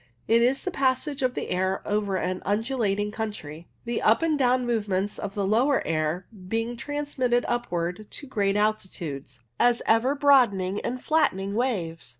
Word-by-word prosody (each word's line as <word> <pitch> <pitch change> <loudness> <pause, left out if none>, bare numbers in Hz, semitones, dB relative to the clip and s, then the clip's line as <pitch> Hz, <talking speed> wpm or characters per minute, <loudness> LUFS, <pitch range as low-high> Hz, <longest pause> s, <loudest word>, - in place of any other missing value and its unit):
It 230 +1 +4
is 255 +3 +2
the 370 - -2
passage 275 0 0
of 255 -1 0
the - - -4
air 190 +1 0
over 205 -2 0
an 185 0 -2
undulating 210 -1 0
country; 205 -8 -6 0.2
the 235 -1 -2
up 225 +9 +4
and 325 -2 +2
down 255 -2 +2
movements 205 -4 -1
of 200 -1 -5
the 200 -2 0
lower 245 +8 +2
air 160 +3 -1 0.2
being 225 +3 -2
transmitted 265 -3 -1
upwards 180 -6 -2
to - - -7
great 205 -7 0
altitudes, 165 - -3 0.2
as 240 -1 +3
ever 235 +5 +3
broadening 230 -10 +3
and 250 +1 -4
flattening 200 -11 +1
waves. 190 - -2
220 Hz, 155 wpm, -26 LUFS, 190-255 Hz, 0.2 s, It